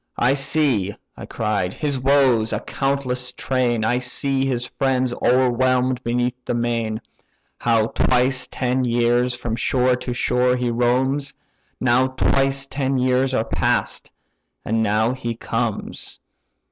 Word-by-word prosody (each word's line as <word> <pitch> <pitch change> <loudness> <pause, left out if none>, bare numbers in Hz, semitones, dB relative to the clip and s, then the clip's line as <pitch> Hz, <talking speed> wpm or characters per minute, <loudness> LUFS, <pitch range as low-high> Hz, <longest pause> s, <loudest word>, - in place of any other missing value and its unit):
I 125 +3 +3
see 135 -8 +1 0.2
(I - - -9
cried) 100 -4 -2
his 145 -3 -1
woes, 130 -4 +3
a 105 - -1
countless 125 -1 -1
train; 125 -4 0
I 120 +2 +1
see 135 +2 0
his 125 -2 -1
friends 130 -2 0
o'erwhelm'd 130 0 +2
beneath 125 +1 -1
the - - -2
main; 115 -2 -1 0.6
How 115 -2 +2
twice 130 +2 +1
ten 130 0 -1
years 120 +1 +1
from 120 -2 -4
shore 125 +1 +2
to 125 - -5
shore 125 +1 +1
he 125 -1 -1
roams: 130 +4 0 0.4
Now 130 +1 +3
twice 135 +1 +1
ten 135 -1 -1
years 130 +1 +1
are 110 - 0
past, - - -1 0.5
and 110 +1 0
now 110 +2 +1
he 120 -3 -4
comes!" 115 -1 -3
125 Hz, 135 wpm, -21 LUFS, 120-130 Hz, 0.6 s, I